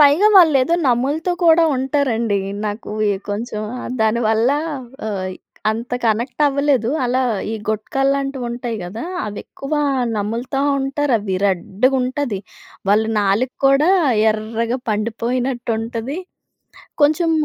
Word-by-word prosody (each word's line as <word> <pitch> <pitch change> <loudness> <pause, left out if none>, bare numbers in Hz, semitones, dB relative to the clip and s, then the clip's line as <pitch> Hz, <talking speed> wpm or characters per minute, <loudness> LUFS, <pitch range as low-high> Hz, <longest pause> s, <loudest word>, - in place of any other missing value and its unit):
పైగా 295 +9 +6
వాళ్ళేదో 320 -3 +5
నమ్ములుతూ 280 +8 +1
కూడా 330 0 +6
ఉంటారండి. 255 -6 0 0.3
నాకు 210 +1 -5 0.2
ఈ - - +2 0.2
కొంచెం 215 +1 -3 0.4
దానివల్లా 225 +4 +2 0.5
ఆహ్, 185 -3 -3 0.4
అంత 230 +3 -5
కనెక్ట్ 235 +6 0
అవ్వలేదు. 275 -4 +1
అలా 255 +2 +1 0.3
ఈ - - -1
గుట్కాల్లాంటివుంటాయి 250 0 -1
గదా! 215 - -6 0.2
అవి 205 -1 -6
ఎక్కువా 295 +2 -3 0.4
నమ్ములుతా 235 +6 -2 0.2
ఉంటారు. 275 0 -1
అవి 200 -2 -3
రెడ్డుగుంటది. 250 +6 0 0.5
వాళ్ళ 210 +2 +4 0.2
నాలుక 205 +6 +1
కూడా 280 +6 +4 0.4
ఎర్రగా 225 +3 -2
పండిపోయినట్టుంటది. 235 - -2 0.8
కొంచెం 315 +3 +3
245 Hz, 100 wpm, -19 LUFS, 220-275 Hz, 0.8 s, పైగా